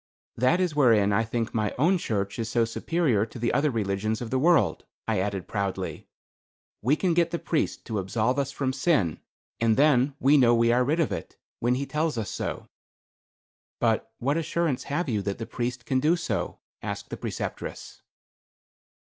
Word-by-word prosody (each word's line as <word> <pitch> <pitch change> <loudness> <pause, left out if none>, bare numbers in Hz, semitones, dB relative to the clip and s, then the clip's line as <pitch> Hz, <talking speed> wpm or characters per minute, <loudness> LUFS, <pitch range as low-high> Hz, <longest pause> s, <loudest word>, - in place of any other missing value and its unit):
"That 130 +9 +3
is 180 -5 0
wherein 110 -8 +4
I 115 - +3
think 115 0 -3
my 110 -2 -1
own 175 +8 +3
church 100 -5 -2
is 115 -1 -2
so 115 0 +2
superior 125 -2 +1
to 115 - -11
the 120 0 0
other 150 +1 +3
religions 110 -2 -1
of 120 -2 -6
the 130 - +1
world," 170 +3 +3 0.2
I - - +1
added, 95 -1 -2
proudly. 100 -2 -3 0.7
"We 130 +7 +3
can 175 +2 +1
get 170 0 +3
the 170 - -2
priest 165 -2 -2
to 110 -3 -2
absolve 110 +7 0
us 140 0 -1
from 135 -2 -1
sin, 135 - +1 0.4
and 115 -1 +2
then 140 -2 +4
we 140 +3 +5
know 120 -3 +5
we 115 0 +3
are 125 +1 +3
rid 150 +6 0
of 160 - +1
it, - - -6 0.2
when 120 +2 +2
he 140 +2 -2
tells 155 -1 -1
us 110 -3 -3
so." - - -4 1.1
"But 115 -1 +1
what 140 +5 0
assurance 165 -3 -1
have 155 +4 -1
you 110 -5 0
that 100 0 -3
the 115 - -5
priest 125 0 -4
can 130 +2 +1
do 155 +6 +3
so?" 165 - -3 0.2
asked - - -5
the - - -4
Preceptress. - - -6
125 Hz, 185 wpm, -26 LUFS, 110-150 Hz, 1.1 s, we